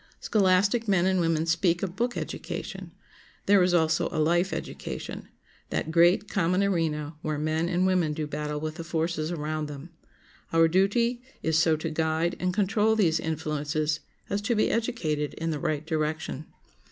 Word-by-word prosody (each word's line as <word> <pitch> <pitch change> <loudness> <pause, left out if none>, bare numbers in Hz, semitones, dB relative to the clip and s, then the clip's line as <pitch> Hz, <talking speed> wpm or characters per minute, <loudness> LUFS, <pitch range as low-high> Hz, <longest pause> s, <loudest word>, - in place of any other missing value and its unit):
Scholastic 200 +3 +2
men 190 -3 +3
and 190 -1 +2
women 165 -2 +1
speak 170 +1 +1
of 185 -2 -3
book 240 +4 -1
education; - - -5 0.5
there 200 -1 +5
is 180 0 +3
also 160 -2 +2
a - - -4
life 175 +4 +2
education—that 160 0 -6
great, 175 +5 +4
common 185 0 +1
arena 160 -5 0
where 155 -1 -2
men 155 +3 0
and 180 +1 +1
women 180 -4 +2
do 155 0 -3
battle 150 0 -3
with 155 +1 -4
the 165 - -5
forces 165 -1 -1
around 155 -2 -3
them. 150 +3 -9 0.6
Our 165 0 +5
duty 220 +8 +2 0.2
is 160 0 +2
so 160 -1 +4
to 160 +1 -4
guide 160 +2 0
and 180 0 0
control 210 +3 +2
these 170 -7 +2
influences 155 -1 -1 0.3
as 200 0 -1
to 230 +3 0
be 215 - +2
educated 165 - -1
in 165 0 -2
the 150 - -3
right 150 +1 -2
direction. 155 -1 -2
165 Hz, 165 wpm, -27 LUFS, 155-185 Hz, 0.6 s, there